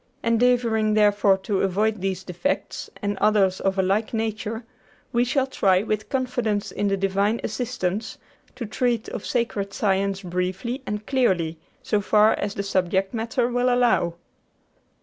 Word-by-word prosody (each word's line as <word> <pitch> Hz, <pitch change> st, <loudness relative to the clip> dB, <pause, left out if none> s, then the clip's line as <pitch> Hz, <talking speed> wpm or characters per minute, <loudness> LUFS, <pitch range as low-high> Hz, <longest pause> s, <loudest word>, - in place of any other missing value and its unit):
Endeavoring, 230 Hz, -2 st, +2 dB
therefore, 205 Hz, -2 st, +4 dB
to 190 Hz, +1 st, -1 dB
avoid 205 Hz, +2 st, +1 dB
these 190 Hz, -1 st, -2 dB
defects 180 Hz, +11 st, -3 dB
and 205 Hz, -1 st, -1 dB
others 195 Hz, -3 st, +3 dB
of 195 Hz, 0 st, 0 dB
a 190 Hz, -, +3 dB
like 210 Hz, +5 st, 0 dB
nature, 220 Hz, +1 st, -3 dB, 0.5 s
we 240 Hz, 0 st, +3 dB
shall 265 Hz, +2 st, +1 dB
try, 195 Hz, -7 st, +2 dB
with 215 Hz, -1 st, -2 dB
confidence 240 Hz, -6 st, -1 dB
in 205 Hz, -, -1 dB
the 195 Hz, 0 st, +1 dB
Divine 195 Hz, +3 st, +1 dB
assistance, 220 Hz, -3 st, -3 dB, 0.4 s
to 250 Hz, -2 st, -5 dB
treat 235 Hz, +1 st, -1 dB
of 210 Hz, -, -6 dB
sacred 210 Hz, -5 st, -1 dB
science 195 Hz, -1 st, 0 dB
briefly 185 Hz, +8 st, -3 dB
and 210 Hz, 0 st, -3 dB
clearly, 180 Hz, -, +1 dB, 0.2 s
so 210 Hz, -, +1 dB
far 210 Hz, +2 st, +4 dB
as 200 Hz, 0 st, -3 dB
the 200 Hz, -, -2 dB
subject 190 Hz, 0 st, 0 dB
matter 230 Hz, +2 st, 0 dB
will 245 Hz, +1 st, +1 dB
allow." 240 Hz, -9 st, +2 dB
210 Hz, 150 wpm, -24 LUFS, 195-235 Hz, 0.5 s, therefore